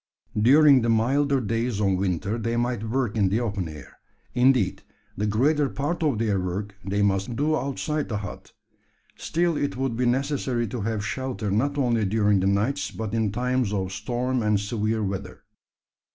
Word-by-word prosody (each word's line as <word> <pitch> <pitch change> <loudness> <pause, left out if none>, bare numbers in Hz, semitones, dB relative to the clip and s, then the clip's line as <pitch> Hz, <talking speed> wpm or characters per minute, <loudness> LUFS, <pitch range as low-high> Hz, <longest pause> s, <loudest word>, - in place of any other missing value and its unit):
During 140 +3 +6
the 115 - 0
milder 135 +5 +2
days 115 -1 -1
of 100 -2 +2
winter 95 +4 -1
they 115 +1 -1
might 120 -2 -1
work 120 -3 -1
in 100 -4 +2
the 105 +4 +1
open 100 -7 -2
air; 75 -4 -12 0.3
indeed, 125 -6 +3 0.3
the 105 +2 -1
greater 140 +7 +2
part 145 +7 -2
of 145 -8 +1
their 105 -3 +1
work 95 +3 -3
they 100 +1 0
must 100 +1 +1
needs 115 - -5
do 155 +2 +2
outside 145 +3 -2
the 110 - -1
hut. 100 0 -8 0.6
Still 170 0 0
it 145 -3 -2
would 130 -3 -1
be 125 +1 +1
necessary 130 -1 0
to 120 0 -4
have 110 0 -2
shelter 125 -4 -3
not 140 +8 0
only 120 -5 +2
during 105 0 +2
the 95 - +1
nights, 105 +9 0
but 110 -2 -5
in 110 -3 +1
times 125 -1 0
of 95 -2 -2
storm 125 +5 -2
and 105 -2 +2
severe 110 +1 -1
weather. 95 -1 -5
115 Hz, 180 wpm, -25 LUFS, 100-130 Hz, 0.6 s, During